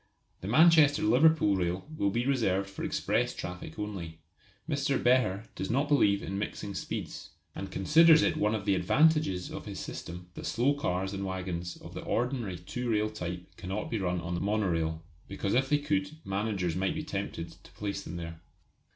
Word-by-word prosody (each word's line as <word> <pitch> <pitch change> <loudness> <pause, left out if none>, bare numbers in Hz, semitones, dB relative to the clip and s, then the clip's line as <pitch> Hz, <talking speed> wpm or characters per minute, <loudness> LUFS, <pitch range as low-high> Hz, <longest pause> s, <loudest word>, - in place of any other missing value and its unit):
The 95 - -7
Manchester 155 +3 +6
Liverpool 125 -2 +4
rail 90 +5 -2
will 100 -9 +1
be 120 +4 -1
reserved 100 -8 +1
for 100 - -7
express - - 0
traffic 90 -3 -7
only. 95 -6 -5 0.5
Mr. 140 -3 +1
Behr 120 -6 +3
does 95 - -4
not 140 +5 +1
believe 105 -9 +3
in 95 +1 -3
mixing 100 -1 -4
speeds, - - -5 0.2
and 95 - -6
considers 160 - +6
it - - +2
one 105 +1 +1
of 100 -2 -4
the 100 - +3
advantages 95 - +2
of - - -7
his - - -6
system 90 +1 -7
that - - -6
slow 125 +6 +2
cars 95 -8 -2
and 100 0 -3
waggons 90 -2 -4
of - - -11
the - - -6
ordinary 120 -6 -1
two 120 +8 -5
rail 110 -1 +1
type 90 -4 -6
cannot 95 +2 -4
be 115 - 0
run 90 -2 0
on 85 +1 -4
the 85 - -2
monorail; 85 -6 0 0.2
because 100 0 -2
if 130 +2 +2
they 145 - +4
could 145 +1 -1
managers 95 -4 -1
might 95 +9 0
be 155 - -3
tempted 100 - -4
to - - -16
place 100 -1 -4
them 85 -3 -7
there. 85 -1 -7
100 Hz, 185 wpm, -30 LUFS, 90-130 Hz, 0.5 s, Manchester